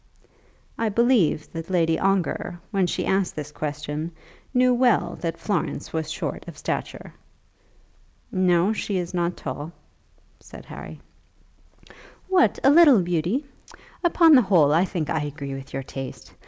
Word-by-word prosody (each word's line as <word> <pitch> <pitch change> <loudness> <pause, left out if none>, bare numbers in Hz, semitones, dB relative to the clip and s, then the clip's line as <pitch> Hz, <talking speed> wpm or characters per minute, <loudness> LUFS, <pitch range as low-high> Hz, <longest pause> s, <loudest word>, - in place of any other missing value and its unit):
I 225 -1 +1
believe 220 -8 +2
that 165 +1 -6
Lady 165 -3 +1
Ongar, 190 -2 -1
when 195 -4 +1
she - - -2
asked 190 -1 0
this 150 -1 -6
question, 150 +2 -4 0.4
knew 250 -1 +3
well 240 -8 +2
that 165 -1 -3
Florence 200 -7 -3
was 160 -1 -2
short 155 - -4
of - - -9
stature. - - -5 1.2
"No; 185 +1 +2
she 205 -2 -2
is 175 -1 -4
not 175 0 -1
tall," 145 +4 -6 0.7
said - - -13
Harry. - - -10 1.3
"What, 370 -2 +3
a 275 - +6
little 290 - +7
beauty? 175 - -1 0.6
Upon 335 -2 +5
the 260 - +8
whole 170 -9 +4
I 170 +4 +4
think 170 -5 -3
I 160 -2 0
agree 145 -1 -5
with 135 0 -8
your 135 0 -4
taste. 135 0 -8
175 Hz, 140 wpm, -24 LUFS, 155-215 Hz, 1.3 s, the